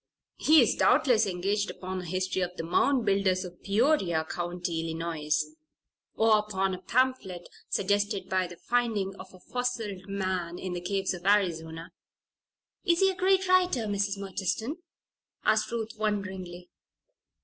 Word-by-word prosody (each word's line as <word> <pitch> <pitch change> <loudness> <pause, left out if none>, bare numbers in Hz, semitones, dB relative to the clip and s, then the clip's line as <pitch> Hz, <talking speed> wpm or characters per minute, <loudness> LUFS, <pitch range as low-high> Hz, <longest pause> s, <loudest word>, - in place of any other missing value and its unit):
He 315 +1 +7
is - - +2
doubtless 225 -5 +4
engaged 195 +3 -1
upon 185 0 -5
a - - -9
history 185 +2 -1
of 180 0 -3
the - - -3
Mound 245 +9 +2
Builders 195 -2 +2
of 175 -1 -11
Peoria 200 - +2
County, 175 0 -3
Illinois; 160 -2 -1 0.8
or 220 -1 +5
upon 195 -2 -1
a 185 - -6
pamphlet 215 -6 0 0.2
suggested 205 0 0
by 185 -1 +1
the 175 - -10
finding 220 -5 0
of 185 - -11
a 185 - -15
fossilized 225 -4 -3
man 185 -3 -2
in 185 -1 -4
the 175 - -4
caves 195 +1 -1
of 175 -1 -8
Arizona." 165 -5 +1 0.9
"Is 340 0 +2
he 385 0 +5
a - - -7
great 380 +1 +2
writer, 365 -8 +3
Mrs. 200 -1 -1
Murchiston?" 200 - -3 0.7
asked 215 +1 +2
Ruth, 225 -1 -3
wonderingly. 190 -4 -3
195 Hz, 145 wpm, -28 LUFS, 180-220 Hz, 0.9 s, He